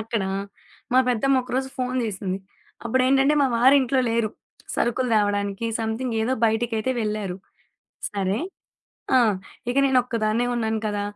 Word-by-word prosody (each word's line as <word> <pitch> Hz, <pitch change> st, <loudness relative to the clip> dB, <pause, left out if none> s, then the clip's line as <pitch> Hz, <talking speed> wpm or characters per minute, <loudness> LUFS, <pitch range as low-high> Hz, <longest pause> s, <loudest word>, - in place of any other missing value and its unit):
అక్కడ, 220 Hz, -1 st, -2 dB, 0.7 s
మా 255 Hz, -, +5 dB
పెద్దమ్మ 260 Hz, +2 st, +2 dB
ఒకరోజు 255 Hz, +2 st, -2 dB
ఫోను 255 Hz, 0 st, -1 dB
చేసింది. 195 Hz, -2 st, -3 dB, 0.5 s
అప్పుడేంటంటే, 270 Hz, +4 st, +3 dB
మా -, -, +4 dB
వారు 260 Hz, +4 st, +6 dB
ఇంట్లో 260 Hz, +1 st, +1 dB
లేరు. 230 Hz, -2 st, +1 dB, 0.4 s
సరుకులు 250 Hz, +1 st, 0 dB
తేవడానికి 205 Hz, +1 st, 0 dB
సమ్‌థింగ్ 225 Hz, +2 st, -2 dB
ఏదో 245 Hz, +4 st, 0 dB
బయటికైతే 225 Hz, +2 st, 0 dB
వెళ్లారు. 210 Hz, -3 st, -3 dB, 0.7 s
సరే 200 Hz, +2 st, -1 dB, 0.8 s
ఆ! -, -, +8 dB, 0.5 s
ఇక 245 Hz, -, -1 dB
నేను 265 Hz, -1 st, +3 dB
ఒక్కదాన్నే 230 Hz, 0 st, 0 dB
ఉన్నాను 220 Hz, -2 st, -1 dB
కదా! 205 Hz, -1 st, -1 dB
230 Hz, 130 wpm, -24 LUFS, 215-255 Hz, 0.8 s, ఆ